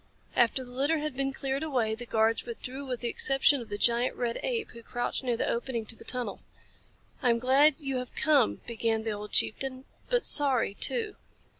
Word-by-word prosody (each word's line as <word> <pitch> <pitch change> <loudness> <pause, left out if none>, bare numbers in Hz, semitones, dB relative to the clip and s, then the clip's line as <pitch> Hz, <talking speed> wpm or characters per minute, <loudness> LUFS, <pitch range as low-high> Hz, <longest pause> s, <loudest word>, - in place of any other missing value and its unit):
After 245 +2 +2
the 245 - -11
litter 280 +6 0
had 300 -2 -4
been 275 +1 -1
cleared 270 0 -3
away 250 -8 -1
the 240 +2 -7
guards 225 0 +1
withdrew 260 +4 -7
with 250 -2 -4
the 240 - -2
exception 270 +3 +2
of 230 - -11
the 205 - -4
giant 235 +3 +2
red 235 -1 -3
ape, 465 -3 -3
who 235 - -12
crouched 245 +3 -3
near 245 -2 -1
the - - -1
opening 235 -1 -3
to 225 - -6
the - - -13
tunnel. 250 -1 -4 0.8
"I 245 - +2
am 235 - +3
glad 270 +4 +3
you 275 -3 -3
have 250 0 -7
come," 290 -6 +2
began 225 -1 -1
the 220 - -2
old 210 0 -7
chieftain, 260 +2 0 0.2
"but - - +1
sorry, 265 -8 +6
too. 435 - +2
250 Hz, 200 wpm, -28 LUFS, 235-275 Hz, 0.8 s, sorry